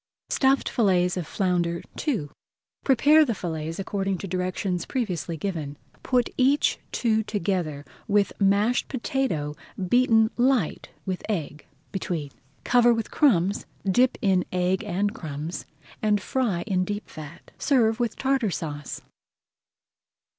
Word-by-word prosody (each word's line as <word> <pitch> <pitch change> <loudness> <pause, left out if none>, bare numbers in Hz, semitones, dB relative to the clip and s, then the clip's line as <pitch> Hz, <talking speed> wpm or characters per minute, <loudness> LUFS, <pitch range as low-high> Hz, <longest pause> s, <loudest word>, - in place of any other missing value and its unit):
STUFFED 270 0 +2
FILLETS 180 -6 +2
OF 175 -5 -3
FLOUNDER 175 -3 0 0.2
II 190 - 0 0.5
Prepare 290 +4 +6
the 240 -7 -1
fillets 160 -3 -4
according 195 -1 -2
to 195 - -6
directions 180 0 -2
previously 180 - -2
given. 155 -6 -4 0.2
Put 250 -2 +1
each 270 +3 +3
two 220 -2 +1
together, 175 -8 -2 0.2
with 205 -1 +2
mashed 200 +5 +3
potato 235 - -2 0.3
beaten 225 -2 +4
light 245 - +1 0.2
with 185 -1 -3
egg 155 -7 -3 0.2
between. 165 -7 -3 0.3
Cover 240 -1 +5
with 225 -1 -4
crumbs, 200 - +2 0.2
dip 245 +7 +3
in 190 -3 +3
egg 185 +1 +1
and 200 +4 -1
crumbs, 155 0 -6 0.3
and 210 -1 +2
fry 205 -5 -1
in 185 -4 +1
deep 205 +3 -4
fat. 155 +1 -11
Serve 235 -5 +3
with 235 -2 0
Tartar 265 -5 +1
Sauce. 145 -5 -5
195 Hz, 125 wpm, -25 LUFS, 175-235 Hz, 0.5 s, Prepare